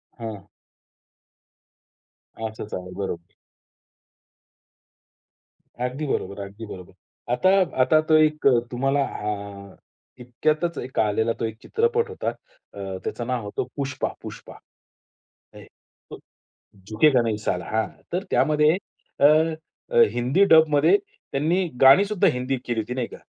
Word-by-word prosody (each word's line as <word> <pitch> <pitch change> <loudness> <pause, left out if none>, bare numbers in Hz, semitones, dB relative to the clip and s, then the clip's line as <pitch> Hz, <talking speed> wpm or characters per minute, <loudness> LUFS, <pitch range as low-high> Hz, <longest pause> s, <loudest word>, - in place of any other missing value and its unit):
हां. 110 -5 -8 2.0
असंच 110 -1 -7
आहे. 90 0 -5
बरोबर. 85 -4 -5 2.5
अगदी 135 +5 -4
बरोबर. 100 -5 -3
अगदी 100 +3 -9
बरोबर. 95 -2 -10 0.4
आता 185 +10 +3 0.3
आता 155 +4 +4
तो 155 - +6
एक 155 -2 +3
अ, 125 -3 +5
तुम्हाला 135 +3 +1
अ, 100 -3 -6 0.4
इतक्यातच 155 +7 -1
एक 130 +1 -4
आलेला 110 +2 +1
तो 115 - -1
एक 110 0 -5
चित्रपट 465 +1 0
होता. 450 - -3
अ, 100 - -9
त्याचं 120 - -4
नाव 125 -3 -2
होतं 105 +4 -3
पुष्पा, 135 -2 -2
पुष्पा. - - -10 1.0
ऐ - - -11 0.5
तू - - -7 0.7
झुकेगा 125 +3 +4
नही 110 -2 -1
साला. 90 -4 -2
हां. 110 0 +1 0.2
तर 180 +3 -1
त्यामध्ये 150 +3 +3 0.4
अ, 145 - +8 0.9
हिंदी 130 +11 +2
डबमध्ये 155 - +5 0.4
त्यांनी 170 +6 +1
गाणीसुद्धा 195 +9 +6
हिंदीत 125 +1 -2
केली 120 -2 -1
होती 125 +4 -6
नाही 125 -3 -2
का? - - -11
125 Hz, 120 wpm, -24 LUFS, 110-155 Hz, 2.5 s, अ